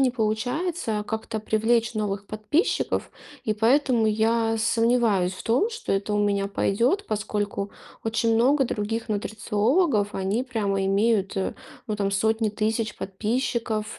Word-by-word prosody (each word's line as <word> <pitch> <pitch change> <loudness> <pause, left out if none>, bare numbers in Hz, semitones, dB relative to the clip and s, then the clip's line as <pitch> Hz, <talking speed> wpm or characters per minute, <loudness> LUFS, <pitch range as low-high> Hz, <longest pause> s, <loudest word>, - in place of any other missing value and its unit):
не 260 -2 +4
получается 240 +2 -1
как-то 220 0 -3
привлечь 225 +2 +1
новых 205 -2 -2
подписчиков. 215 - 0 0.3
И 215 - +1
поэтому 235 +1 +3
я 225 +1 +2
сомневаюсь 225 -5 +2
в - - -9
том, 255 - +2
что 450 - -4
это 200 +2 0
у 210 - +1
меня 200 -1 +1
пойдет, 240 - +1
поскольку 205 -1 -2 0.3
очень 225 0 +1
много 270 +4 +4
других 225 0 -3
нутрициологов, 215 - +1
они 195 +6 0
прямо 205 -6 -1
имеют, 200 +1 +2
а, 190 - -1 0.3
ну, 215 - -1
там 200 -1 0
сотни 220 +2 +1
тысяч 215 +1 -1
подписчиков 220 +1 -2
220 Hz, 135 wpm, -25 LUFS, 205-235 Hz, 0.3 s, не